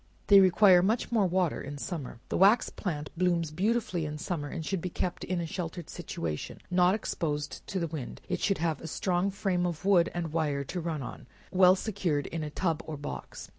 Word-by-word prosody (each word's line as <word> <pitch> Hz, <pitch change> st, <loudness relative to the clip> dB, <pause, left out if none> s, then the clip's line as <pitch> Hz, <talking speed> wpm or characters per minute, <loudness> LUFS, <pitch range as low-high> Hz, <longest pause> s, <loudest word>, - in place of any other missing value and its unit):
They 200 Hz, -1 st, +8 dB
require 185 Hz, -1 st, +6 dB
much 220 Hz, +7 st, 0 dB
more 215 Hz, -5 st, +3 dB
water 180 Hz, -2 st, 0 dB
in 145 Hz, +1 st, -6 dB
summer. 140 Hz, -6 st, -5 dB
The -, -, 0 dB
wax 205 Hz, +5 st, +5 dB
plant 150 Hz, -7 st, -4 dB
blooms 170 Hz, -2 st, +1 dB
beautifully 190 Hz, 0 st, 0 dB
in 150 Hz, 0 st, -5 dB
summer, 150 Hz, -1 st, -3 dB
and 155 Hz, +2 st, -5 dB
should 190 Hz, 0 st, -1 dB
be 180 Hz, -, -3 dB
kept 175 Hz, +1 st, -3 dB
in 185 Hz, -1 st, -1 dB
a 170 Hz, -, -2 dB
sheltered 170 Hz, 0 st, -5 dB
situation, 75 Hz, -2 st, -5 dB
not 180 Hz, +1 st, +4 dB
exposed 150 Hz, -8 st, -3 dB
to 195 Hz, -, -3 dB
the 170 Hz, -, 0 dB
wind; 155 Hz, -6 st, -6 dB
it 180 Hz, -1 st, -1 dB
should 195 Hz, -, +1 dB
have 160 Hz, -2 st, -1 dB
a -, -, -6 dB
strong 180 Hz, +3 st, 0 dB
frame 190 Hz, -3 st, 0 dB
of 170 Hz, +1 st, -5 dB
wood 180 Hz, -4 st, +5 dB
and 165 Hz, -3 st, -3 dB
wire 150 Hz, -4 st, 0 dB
to 175 Hz, +6 st, -4 dB
run 160 Hz, -4 st, -3 dB
on, -, -, -8 dB, 0.2 s
well 185 Hz, -1 st, +6 dB
secured 180 Hz, -9 st, -1 dB
in 165 Hz, -, -4 dB
a 150 Hz, -, -3 dB
tub 165 Hz, +1 st, -1 dB
or 155 Hz, -2 st, -4 dB
box. 145 Hz, -, -7 dB
175 Hz, 210 wpm, -29 LUFS, 155-190 Hz, 0.2 s, They